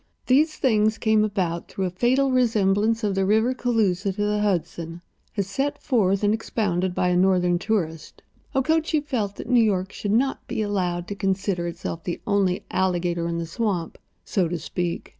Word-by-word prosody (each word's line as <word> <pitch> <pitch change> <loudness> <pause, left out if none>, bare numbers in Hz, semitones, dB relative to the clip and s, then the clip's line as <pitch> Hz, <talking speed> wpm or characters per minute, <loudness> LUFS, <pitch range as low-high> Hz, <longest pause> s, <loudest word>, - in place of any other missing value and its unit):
These 305 +5 +3
things 220 -4 +2
came 220 -1 +3
about 185 -5 -1
through 190 - -3
a 180 - -2
fatal 255 +8 +2
resemblance 225 -2 +2
of 205 -2 +1
the 195 0 +1
river 220 +6 +3
Cooloosa 210 -7 0
to 205 - -4
the 210 0 0
Hudson, 170 -3 -2 0.4
as 200 - +1
set 270 +9 -2
forth 200 -7 +1
and 205 +1 +3
expounded 190 -5 -1
by 180 - +1
a 180 - +2
Northern 180 -1 +3
tourist. 170 -6 -3 0.3
Okochee 315 +3 +2
felt 215 -8 -2
that - - -8
New 245 -2 +4
York 190 -3 0
should 205 - -3
not 265 +5 0
be 215 - -2
allowed 180 -4 -1
to - - -2
consider 195 -2 -1
itself 170 -1 -5
the 175 - -3
only 195 -3 +1
alligator 175 -2 0
in 170 0 -2
the 170 - -2
swamp, 175 -1 -2 0.3
so 185 -4 +1
to 175 +1 -3
speak. 170 +2 -4
200 Hz, 180 wpm, -24 LUFS, 180-225 Hz, 0.4 s, New